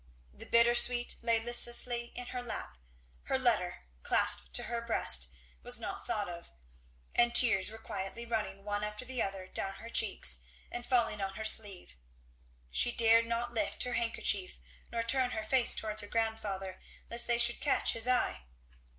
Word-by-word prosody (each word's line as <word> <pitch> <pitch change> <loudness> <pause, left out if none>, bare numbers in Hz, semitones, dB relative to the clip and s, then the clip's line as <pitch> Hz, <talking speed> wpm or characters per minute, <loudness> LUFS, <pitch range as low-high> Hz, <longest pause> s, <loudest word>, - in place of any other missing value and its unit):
The - - -12
bittersweet 240 +1 +3
lay 230 -1 +2
listlessly 240 +1 +3
in 245 - -7
her 250 - -4
lap; 220 - -7 0.5
her 265 - -1
letter, 220 -9 0 0.2
clasped 65 0 +2
to - - +6
her 235 -1 -4
breast, 75 - +2 0.3
was - - +3
not - - -7
thought - - -2
of; 60 - -10 0.6
and 240 0 +1
tears 225 -6 +5
were 220 - -10
quietly 210 +1 -7
running 210 -4 -4
one 205 0 -3
after 210 +3 -6
the 255 -1 -4
other 195 -1 -4
down 195 +1 -3
her 230 +1 -11
cheeks 190 - +3 0.3
and 240 0 -7
falling 235 -5 0
on 195 0 -5
her 220 - -6
sleeve; 200 - 0 0.7
she 240 - +2
dared 230 0 +3
not 235 +1 -3
lift 215 -3 -1
her 250 - -4
handkerchief 205 - 0 0.3
nor 230 0 -3
turn 255 +2 +2
her 220 - -3
face 245 +2 +3
towards 215 -1 -1
her 205 - -8
grandfather 205 -4 -4 0.3
lest 235 0 +3
they 240 -1 +1
should 235 0 +2
catch 290 - +1
his 230 +1 +4
eye. 250 - -1
230 Hz, 170 wpm, -31 LUFS, 200-240 Hz, 0.7 s, to